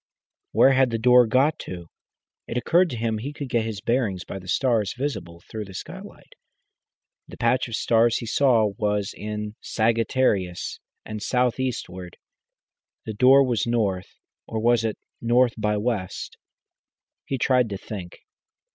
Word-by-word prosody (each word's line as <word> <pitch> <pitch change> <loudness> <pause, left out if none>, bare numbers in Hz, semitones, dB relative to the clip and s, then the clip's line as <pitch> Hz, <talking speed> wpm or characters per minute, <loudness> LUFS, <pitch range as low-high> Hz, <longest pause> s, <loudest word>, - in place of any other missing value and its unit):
Where 135 - +5
had 130 -1 +4
the 115 - -1
door 125 +1 +6
got 135 +7 +2
to? 90 -2 -7 0.6
It 115 - -3
occurred 170 +9 +3
to 125 - -5
him 110 -1 -1
he 135 +6 -5
could 145 -2 -7
get 115 -2 +1
his 110 -3 -5
bearings 115 -7 -1
by 95 - -6
the 95 - -13
stars 115 -2 +1
visible 85 -12 -4
through 110 -1 -6
the 95 -1 -12
skylight. - - -10 0.9
The - - -11
patch 125 +3 +1
of 115 - -4
stars 115 +1 +3
he 120 - -5
saw 115 -3 +3
was 105 -1 0
in 105 0 -5
Sagittarius 110 -5 0 0.3
and 110 -1 -6
south 125 +2 +1
eastward; 95 -9 -4 0.9
the 110 - -4
door 130 +5 +6
was 120 -4 0
north 100 -6 0 0.4
or 110 - -3
was 120 0 +3
it 110 -2 -2 0.2
north 120 +1 +3
by 105 -1 0
west? 105 -4 -3 0.9
He 135 - -2
tried 125 -2 +2
to 100 - -4
think. 95 -4 -8
115 Hz, 155 wpm, -24 LUFS, 105-125 Hz, 0.9 s, door